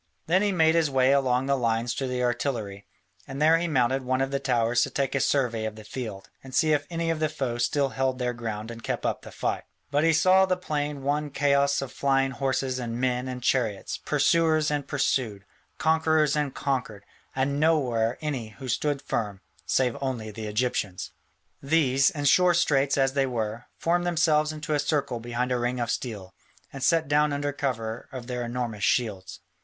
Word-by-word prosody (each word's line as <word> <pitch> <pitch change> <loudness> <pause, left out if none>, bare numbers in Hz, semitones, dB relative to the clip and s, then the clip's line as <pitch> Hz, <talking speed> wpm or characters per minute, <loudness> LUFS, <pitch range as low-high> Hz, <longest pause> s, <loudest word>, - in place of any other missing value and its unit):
Then 180 +4 +3
he 205 -1 +2
made 160 -3 +4
his 165 -3 +2
way 130 -1 +3
along 130 -2 +2
the 140 0 +2
lines 115 -1 0
to 135 +1 -3
the 125 0 -2
artillery, 120 -5 -2 0.4
and 135 - -6
there 160 +2 +5
he 175 - -1
mounted 135 -3 +1
one 130 0 -1
of 135 0 0
the 140 - 0
towers 120 -2 +1
to - - +1
take 140 -1 -1
a 140 - +1
survey 125 -5 +1
of 110 -1 -4
the 110 - -11
field, 105 -4 -6 0.2
and 130 -1 -8
see 155 +1 +3
if 145 -1 0
any 165 -1 -1
of 160 - -2
the 155 -1 +1
foe 120 -4 -3
still 140 +3 +1
held 130 -1 -1
their 125 -1 -1
ground 110 -1 -5
and 115 0 -9
kept - - -3
up - - -1
the - - -11
fight. - - -2 0.3
But 145 +1 +2
he 165 - +5
saw 185 +4 +5
the 185 -1 +1
plain 145 -5 -3
one 145 +2 0
chaos 140 0 +2
of 130 - -7
flying 135 -1 +1
horses 135 -1 -1
and 120 -1 -4
men 125 0 0
and 125 -1 -6
chariots, 115 -6 0
pursuers 155 +1 +2
and 145 -2 -2
pursued, 120 -8 -1 0.3
conquerors 160 -2 +2
and 150 -2 0
conquered, 125 -8 -3 0.3
and 140 +2 0
nowhere 125 -8 +2
any 140 -7 -3
who 130 -1 -7
still 145 +4 +1
stood 140 - -11
firm, 105 -7 -3 0.3
save 125 -3 +1
only 120 -5 -3
the 110 +1 -6
Egyptians. 105 -4 -2 0.5
These, 135 -2 +3
in 145 -1 -4
sore 180 +5 +5
straits 145 -5 +2
as 135 -1 +2
they 135 -1 +1
were, 115 -1 -3
formed 175 +1 +1
themselves 155 -3 +2
into 155 0 -4
a 145 - +2
circle 145 -4 -1
behind 120 +2 -2
a 125 - +1
ring 120 +1 -1
of 120 -1 -1
steel, 105 -8 -5 0.4
and 135 - -7
sat 165 +3 +2
down 150 +1 +3
under 145 0 -2
cover 115 -6 -3
of 130 -2 -7
their 125 -1 -3
enormous 120 -3 -4
shields. 100 -6 -1
135 Hz, 200 wpm, -26 LUFS, 120-150 Hz, 0.5 s, there